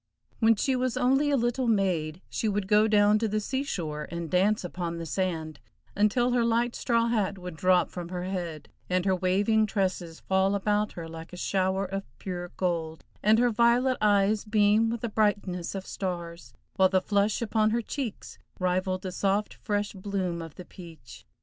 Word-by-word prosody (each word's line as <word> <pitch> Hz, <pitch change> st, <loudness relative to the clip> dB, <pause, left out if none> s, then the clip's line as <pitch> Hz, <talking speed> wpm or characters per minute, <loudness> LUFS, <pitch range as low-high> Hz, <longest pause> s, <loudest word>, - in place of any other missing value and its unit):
When 225 Hz, 0 st, +5 dB
she 260 Hz, +5 st, 0 dB
was 255 Hz, 0 st, -1 dB
only 265 Hz, +3 st, +3 dB
a 285 Hz, -, +3 dB
little 240 Hz, +1 st, 0 dB
maid, 180 Hz, -6 st, 0 dB
she 220 Hz, -, -2 dB
would 205 Hz, -1 st, -1 dB
go 210 Hz, +1 st, +4 dB
down 210 Hz, 0 st, +4 dB
to 225 Hz, -, 0 dB
the 215 Hz, +1 st, 0 dB
sea 260 Hz, +5 st, -2 dB
shore 155 Hz, -, -4 dB
and 170 Hz, -1 st, -5 dB
dance 195 Hz, +4 st, +2 dB
upon 175 Hz, -1 st, -4 dB
the 165 Hz, -, -5 dB
sand, 160 Hz, -2 st, -3 dB, 0.4 s
until 215 Hz, +5 st, +2 dB
her 245 Hz, -1 st, +2 dB
light 235 Hz, +1 st, +1 dB
straw 235 Hz, -1 st, +1 dB
hat 205 Hz, -4 st, 0 dB
would 180 Hz, -2 st, -7 dB
drop 180 Hz, +2 st, +2 dB
from 175 Hz, -2 st, -6 dB
her 180 Hz, -1 st, -4 dB
head, 175 Hz, -5 st, -4 dB, 0.2 s
and 180 Hz, 0 st, +1 dB
her 190 Hz, -1 st, +3 dB
waving 200 Hz, +4 st, +2 dB
tresses 185 Hz, -5 st, -2 dB
fall 190 Hz, +1 st, +1 dB
about 210 Hz, +1 st, 0 dB
her 165 Hz, -2 st, -7 dB
like 165 Hz, +1 st, -10 dB
a -, -, -7 dB
shower 190 Hz, +1 st, 0 dB
of 195 Hz, +1 st, -3 dB, 0.2 s
pure 175 Hz, -2 st, -5 dB
gold, 165 Hz, -3 st, -2 dB, 0.2 s
and 215 Hz, +2 st, +4 dB
her 240 Hz, +1 st, +3 dB
violet 240 Hz, +3 st, +3 dB
eyes 205 Hz, 0 st, +3 dB
beam 215 Hz, +1 st, +3 dB
with 230 Hz, -1 st, -3 dB
the 235 Hz, -, -1 dB
brightness 205 Hz, -5 st, 0 dB
of 190 Hz, -1 st, -5 dB
stars, 175 Hz, -3 st, -5 dB, 0.3 s
while 190 Hz, -1 st, +5 dB
the 190 Hz, 0 st, +3 dB
flush 205 Hz, +2 st, +1 dB
upon 215 Hz, -1 st, +1 dB
her 235 Hz, +1 st, 0 dB
cheeks 250 Hz, -3 st, -6 dB, 0.2 s
rivaled 185 Hz, 0 st, -1 dB
the 185 Hz, -, -4 dB
soft, 200 Hz, +3 st, 0 dB
fresh 205 Hz, 0 st, -2 dB
bloom 185 Hz, -3 st, -3 dB
of 165 Hz, -2 st, -9 dB
the 180 Hz, -, -10 dB
peach. 165 Hz, -10 st, -13 dB
195 Hz, 190 wpm, -27 LUFS, 180-220 Hz, 0.4 s, When